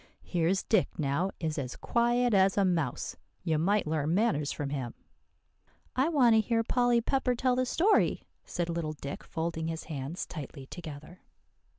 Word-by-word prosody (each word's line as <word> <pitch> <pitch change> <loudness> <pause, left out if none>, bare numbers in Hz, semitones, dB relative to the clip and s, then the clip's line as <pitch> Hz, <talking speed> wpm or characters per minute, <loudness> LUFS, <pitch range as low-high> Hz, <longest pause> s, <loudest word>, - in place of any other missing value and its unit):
"Here's 175 +2 +1
Dick, 215 -5 +1
now, 150 +5 0
is 160 -2 -2
as 125 -3 -4
quiet 240 0 +2
as 195 0 +4
a 200 - +4
mouse. 165 -8 -1 0.3
You 160 -4 +1
might 200 +6 +2
learn 155 +1 0
manners 150 -9 +1
from 140 -1 -4
him." 130 -5 -4 1.0
"I 265 +5 +3
want 260 -8 +5
to 220 - +6
hear 225 +1 +1
Polly 245 0 +2
Pepper 255 0 +1
tell 250 +1 +2
the 255 0 +1
story," 390 - +3 0.2
said 175 -1 -3
little 165 -2 -2
Dick, 140 -1 -7
folding 160 0 -3
his 165 0 -4
hands 145 +2 -5
tightly 140 -3 -8
together. 155 +2 -9
175 Hz, 165 wpm, -30 LUFS, 155-235 Hz, 1.0 s, to